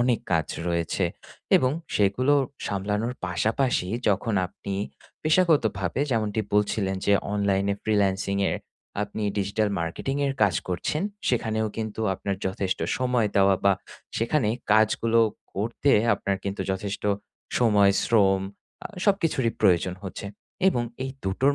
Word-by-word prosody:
অনেক 120 -2 +2
কাজ 80 -3 +2 0.2
রয়েছে। 85 +2 0 0.5
এবং 130 - +2 0.3
সেগুলো 115 +8 +3 0.3
সামলানোর 105 +4 -1
পাশাপাশি 105 - 0 0.2
যখন 105 +2 +1
আপনি 100 +2 -7 0.5
পেশাগতভাবে, 145 - +2
যেমনটি 110 -2 0
বলছিলেন 100 -2 +1
যে 100 - +4 0.2
অনলাইনে 100 -1 +1
ফ্রিল্যান্সিং 100 -2 +1
এ - - -1 0.5
আপনি 105 +1 -5 0.2
ডিজিটাল 100 +2 0
মার্কেটিংয়ের 135 +12 -1
কাজ 100 -3 +4
করছেন। 95 - -1 0.3
সেখানেও 110 -3 0
কিন্তু 110 -1 -4
আপনার 100 +1 -3
যথেষ্ট 95 0 -1 0.2
সময় 125 -4 +1
দেওয়া 100 0 +5
বা 100 - +6 0.4
সেখানে 115 +1 +1 0.2
কাজগুলো 110 +1 +3 0.3
করতে 115 +7 0 0.2
আপনার 100 0 -2
কিন্তু 100 0 -3
যথেষ্ট 95 +1 -3 0.6
সময়, 105 -4 +5
শ্রম 95 -4 +4 0.4
আ - - -1 0.2
সবকিছুরই 165 - +2
প্রয়োজন 90 -3 +3
হচ্ছে। 95 +2 -6 0.4
এবং 120 -10 +1 0.2
এই 135 - -3
দুটোর 130 +9 +2
105 Hz, 120 wpm, -26 LUFS, 95-120 Hz, 0.6 s, বা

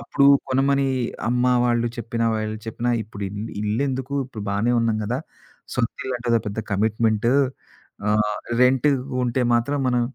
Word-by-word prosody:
అప్పుడు 140 +3 +2 0.2
కొనమని 135 +1 +2 0.4
అమ్మ 125 +1 +1 0.2
వాళ్ళు 120 -1 +2
చెప్పినా, 115 0 -2
వాళ్ళు 110 0 -2
చెప్పినా 120 +2 -2
ఇప్పుడు 105 -1 -9
ఇల్ 105 +3 -6
ఇల్లెందుకు? 130 +5 -1
ఇప్పుడు 120 -5 -8
బానే 105 +5 +1
ఉన్నాం 115 -1 +1
గదా! 120 +5 -1 0.6
సొంతిళ్ళంటే 125 0 -2
అదో 115 - +4
పెద్ద 105 +1 -4
కమిట్మెంటు 110 +2 +1 0.8
ఆహ్, 105 0 +2 0.3
రెంటు, 130 +3 +4 0.3
ఉంటే 120 +2 0
మాత్రం 135 +5 +1
మనం 125 -1 +2
120 Hz, 135 wpm, -23 LUFS, 110-125 Hz, 0.8 s, అదో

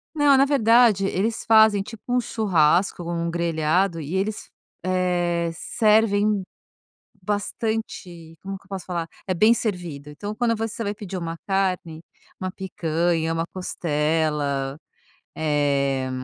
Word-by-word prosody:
Não, 290 -2 +5
na 270 - +6
verdade 230 -6 +4
eles 215 +5 -1
fazem 220 -2 +6
tipo 220 +1 -10
um 250 - +4
churrasco 185 -6 +2
ou 170 - -4
um 170 0 -2
grelhado 170 +1 0
e 155 +6 -5
eles, 210 +3 -2 0.3
eh, 175 -2 0
servem 210 0 +2 0.8
bastante 205 -5 -4
como 195 0 -5
que 190 - -17
eu 195 - -25
posso 190 -2 -6
falar? 170 -2 -3 0.2
É 185 - 0
bem 215 +6 +5
servido. 175 -11 -3
Então 205 +9 -6
quando 230 -1 +1
você 225 +1 -4
vai 205 -1 -2
pedir 195 -3 -6
uma 165 -1 -4
carne, 185 -5 -1 0.4
uma 185 - -2
picanha, 170 -3 -1
uma 165 - -1
costela, 150 -5 -1 0.6
eh, 140 -3 0
185 Hz, 135 wpm, -23 LUFS, 165-210 Hz, 0.8 s, na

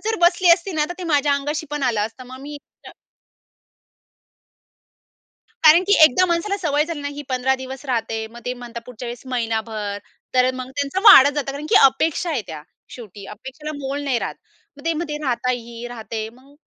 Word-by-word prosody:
जर 445 0 0
बसली 350 +1 +4
असती 355 +2 0
ना 305 -1 +1
तर - - -4
ते 360 - -6
माझ्या 290 -3 +2
अंगाशी 295 +2 -3
पण 295 -1 -3
आलं 235 -5 +1
असतं, 255 +3 -13
मग 260 +1 -11
मी 290 +1 -8 0.3
अ - - -11 2.7
कारण 320 +4 +7
की 405 - +5
एकदा 310 +6 +5
माणसाला 365 +4 -1
सवय 300 -5 +1
झाली 320 -3 -5
नाही 285 0 -5
ही 290 - -5
15 255 +1 +1
दिवस 260 +1 -8
राहते, 225 -3 -2
मग 235 +1 -13
ते 250 - -1
म्हणतात 240 -1 -9
पुढच्या 250 0 -9
वेळेस 240 0 -7
महिनाभर 220 -4 -3 0.4
तर 255 0 +4
मग 255 0 -7
त्यांचं 285 +6 -2
वाढत 275 +2 +9
जातं. 275 -2 -2
कारण 285 +2 -7
की - - +3
अपेक्षा 315 +6 +2
आहे 275 -8 -1
त्या 155 -2 -7 0.3
शेवटी. 210 -4 -11
अपेक्षेला 265 +9 -8
मोल 280 +1 -4
नाही 260 -4 0
राहत. - - -4 0.4
मग 285 - -14
ते 330 - +1
मते 305 -2 -4
राहता 250 -1 -1
ही 235 0 -6
राहते 220 -2 -6
मग 265 +4 -21
265 Hz, 190 wpm, -21 LUFS, 240-300 Hz, 2.7 s, वाढत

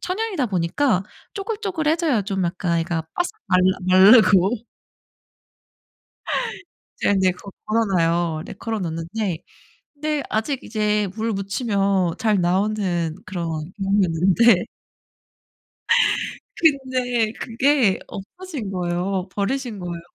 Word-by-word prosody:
천연이다 375 - -2
보니까 190 +4 +1 0.3
쪼글쪼글해져요. 340 - 0
좀 195 -2 -2
약간 170 -1 -1
애가 165 -1 -2
바삭 355 +2 0 0.2
말라 185 0 +3 0.3
마르고 220 -1 +5 2.3
이제 - - +2
근데 190 -1 +3
거 195 +2 -11
걸어놔요. 175 -7 +1
네 - - -8
걸어놨는데 185 -2 -3 0.6
근데 300 0 -2
아직 245 +5 -1
이제 210 -2 0
물 225 +1 -1
묻히면 195 -3 0
잘 215 -4 +2
나오는 180 -3 0
그런 165 -3 -4
경우였는데 195 +2 +3 2.0
근데 255 -7 +1
그게 250 -3 +2
없어진 270 - -7
거예요. 180 +1 -2
버리신 230 +1 -2
거예요. 175 -2 -5
200 Hz, 230 characters per minute, -22 LUFS, 180-245 Hz, 2.3 s, 마르고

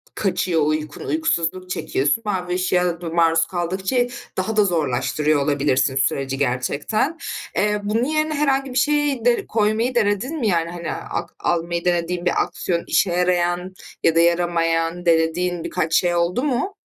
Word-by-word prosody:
kaçıyor 180 -4 0
uykun, 155 0 -3
uykusuzluk 185 - -1
çekiyorsun. 145 +3 0
Mavi 180 -3 -2
ışığa 180 -1 0
da 170 - -4
maruz 165 0 +3
kaldıkça 190 +6 -2 0.4
daha 215 +4 -2
da 210 - +5
zorlaştırıyor 150 -2 0
olabilirsin 140 -2 +1
süreci 135 0 0
gerçekten. 140 - -1 0.4
Eee, 210 0 +1
bunun 215 +3 0
yerine 310 +2 0
herhangi 275 -2 +1
bir 250 - -3
şeyi 290 -3 +1
de 245 -1 +3
koymayı 220 +3 +1
denedin 235 +7 0
mi? 235 - 0
Yani, 170 -4 +1
hani, 170 -2 -5
ak - - -4
almayı 170 0 -1
denediğin 175 0 0
bir 175 - +2
aksiyon, 170 -2 -3
işe 190 - +2
yarayan 180 +1 0 0.3
ya 165 - +3
da - - +5
yaramayan, 170 0 +1
denediğin 170 +1 +1
birkaç 165 -3 -2
şey 175 -1 +2
oldu 175 +8 0
mu? 300 +8 -1
175 Hz, 150 wpm, -21 LUFS, 165-210 Hz, 0.4 s, da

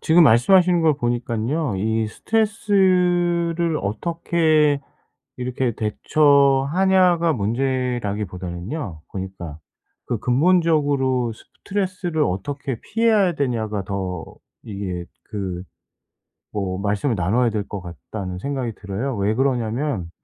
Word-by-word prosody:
지금 170 +2 +5
말씀하시는 175 - +5
걸 155 -2 +4
보니깐요. 120 +1 -1
이 110 +3 0
스트레스를 180 - +1
어떻게 155 - +1 0.6
이렇게 125 0 -1
대처하냐가 155 - +3
문제라기보다는요 105 - -3
보니까. 95 -5 -6 0.5
그 120 - -1
'근본적으로 140 -4 +2
스트레스를 185 - -3
어떻게 130 +7 -3
피해야 220 -4 +2
되냐.'가 110 -8 -2
더 95 -3 -4 0.4
이게 95 -4 -5
그 95 -2 -6 0.9
뭐 95 -3 -2
말씀을 105 +6 0
나눠야 110 +8 +2
될 105 -2 -3
것 100 - -6
같다는 90 +3 -7
생각이 130 -1 -3
들어요. 105 +6 -4
왜 100 +1 +1
그러냐면 120 - -1
125 Hz, 260 characters per minute, -22 LUFS, 100-160 Hz, 0.9 s, 지금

